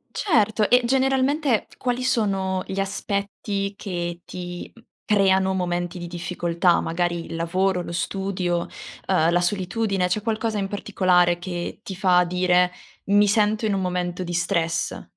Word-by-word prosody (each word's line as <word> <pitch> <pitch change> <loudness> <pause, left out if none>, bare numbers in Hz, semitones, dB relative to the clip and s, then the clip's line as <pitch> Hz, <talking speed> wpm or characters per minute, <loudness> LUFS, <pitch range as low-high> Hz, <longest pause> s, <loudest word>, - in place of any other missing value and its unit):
Certo. 220 - +2
E 250 0 +5
generalmente, 265 0 +2
quali 250 0 -1
sono 195 -6 0
gli 195 - -3
aspetti 200 0 -2
che 175 -3 -4
ti 175 -1 -7
uhm, 230 - -19 0.2
creano 190 -2 +3
momenti 175 0 -2
di 175 - -6
difficoltà? 175 0 0
Magari 170 0 -1
il - - -7
lavoro, 180 +2 0
lo 170 - -7
studio, 180 -1 -1 0.5
uhm, 170 -3 +3
la 175 - +3
solitudine, 195 +1 0
c'è 185 +4 -1
qualcosa 220 -1 -1
in 195 - -1
particolare 180 -3 +2
che 175 +1 -5
ti 195 -4 -7
fa 180 -2 +4
dire: 180 0 +2 0.3
"Mi 205 +1 +4
sento 215 +1 +2
in 205 - +1
un 195 - 0
momento 180 0 -2
di 175 - -5
stress?" 170 -1 -1
190 Hz, 145 wpm, -23 LUFS, 175-205 Hz, 0.5 s, E